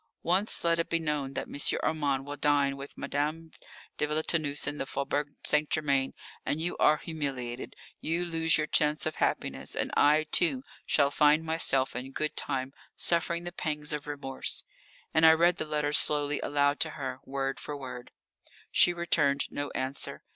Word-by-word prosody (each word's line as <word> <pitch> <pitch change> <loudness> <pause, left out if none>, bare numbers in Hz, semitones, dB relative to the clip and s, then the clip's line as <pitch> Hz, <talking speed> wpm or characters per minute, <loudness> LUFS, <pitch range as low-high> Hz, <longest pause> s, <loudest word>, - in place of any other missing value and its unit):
Once 190 +5 +2
let 170 0 +2
it 165 - -1
be 170 - +1
known 150 -4 -2
that - - -3
M. 145 - +1
Armand 140 -4 0
will 145 0 -5
dine 145 -1 +2
with 140 +1 -10
Madame 155 +3 -3 0.5
de 150 - +1
Villetaneuse 155 -1 0
in 150 +1 -3
the 135 - -3
Faubourg 145 +1 -2
St. 150 0 +1
Germain, 140 -3 0 0.3
and 150 - -2
you 170 +2 -1
are 155 - +4
humiliated, 135 -7 -5 0.2
you 170 +2 -1
lose 165 -1 +2
your 155 - 0
chance 150 0 +2
of 155 - -3
happiness, - - -1
and - - -2
I, 150 +2 +5
too, 255 +10 +3 0.2
shall 140 -1 +3
find 150 +2 +4
myself 150 -5 +2
in 130 +2 -6
good 155 +2 -1
time 130 0 -2 0.2
suffering 170 0 +1
the 175 - -5
pangs 150 -3 -3
of 150 -1 -5
remorse," 140 -2 -4 0.5
and 160 - +3
I 160 0 +9
read 170 +2 +3
the 155 - -3
letter 150 -1 -1
slowly 145 -1 +3
aloud 145 0 +1
to - - +1
her, 130 -2 -4
word 135 0 -3
by 150 - -4
word. 125 -3 -8 0.6
She 175 - +5
returned 140 -5 +1
no 145 0 -3
answer. 130 +1 -2
150 Hz, 175 wpm, -29 LUFS, 140-160 Hz, 0.6 s, I